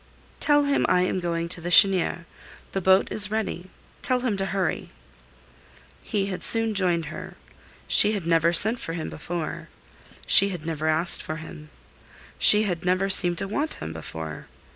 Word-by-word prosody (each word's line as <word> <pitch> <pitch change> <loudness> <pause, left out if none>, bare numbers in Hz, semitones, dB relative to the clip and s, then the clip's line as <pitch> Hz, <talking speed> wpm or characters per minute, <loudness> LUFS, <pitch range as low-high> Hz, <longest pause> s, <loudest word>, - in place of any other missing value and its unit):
"Tell 290 -1 +2
him 285 0 0
I 180 - +2
am 185 +1 -2
going 170 -1 -4
to 170 - -6
the 175 - -5
Chênière. 180 -2 +3 0.5
The 195 - -4
boat 190 +1 +2
is 205 -1 +4
ready; 205 -4 -5 0.3
tell 255 -1 -1
him 245 -5 -2
to 195 0 -2
hurry." 190 -4 -3 1.1
He 200 -2 -3
had 185 -3 -6
soon 225 -1 +3
joined 175 -5 -1
her. - - -10 0.5
She 210 - +5
had 200 -5 -5
never 165 0 +1
sent 220 +7 +3
for 165 - -7
him 165 -2 -6
before. 165 +1 -7 0.6
She 200 - +5
had 175 -5 -8
never 160 -1 -4
asked 160 +2 +1
for 155 - -7
him. 155 -1 -12 0.7
She 210 0 +6
had 180 -5 -4
never 185 +2 0
seemed 175 -2 +6
to 195 - -4
want 290 +10 -4
him 80 - -8
before. 80 -1 -9
180 Hz, 170 wpm, -23 LUFS, 165-200 Hz, 1.1 s, She